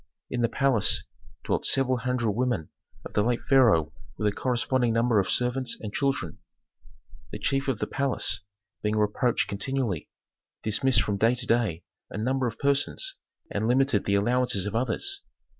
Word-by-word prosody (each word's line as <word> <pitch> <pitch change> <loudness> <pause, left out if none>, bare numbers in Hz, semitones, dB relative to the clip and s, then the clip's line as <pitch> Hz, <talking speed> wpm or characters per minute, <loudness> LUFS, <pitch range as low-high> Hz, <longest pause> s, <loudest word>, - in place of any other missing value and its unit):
In 125 - -1
the 115 - +2
palace 130 -4 +2 0.4
dwelt - - -1
several 130 -1 +2
hundred 120 -2 0
women 120 -7 -1 0.4
of - - -8
the 105 - +3
late 120 +2 0
pharaoh 110 - +4 0.2
with 105 - 0
a - - +3
corresponding 125 -1 +1
number 115 -1 +3
of 95 - 0
servants 125 0 0
and 105 -1 -6
children. 140 -1 -1 0.9
The - - -4
chief 135 0 -1
of 135 -5 0
the - - -2
palace, 135 -7 -1 0.4
being 105 0 0
reproached 105 +3 +1
continually, 100 - -2 0.5
dismissed 110 +2 +3
from 105 -1 -1
day 115 +4 +3
to 120 0 -3
day 110 -9 +1 0.3
a - - -7
number 130 +3 0
of 115 -1 -5
persons, 140 - 0 0.4
and 110 - -1
limited 130 -3 +2
the 100 - +2
allowances 120 -1 +1
of 105 +1 -4
others. 390 - -1
120 Hz, 160 wpm, -27 LUFS, 105-130 Hz, 0.9 s, pharaoh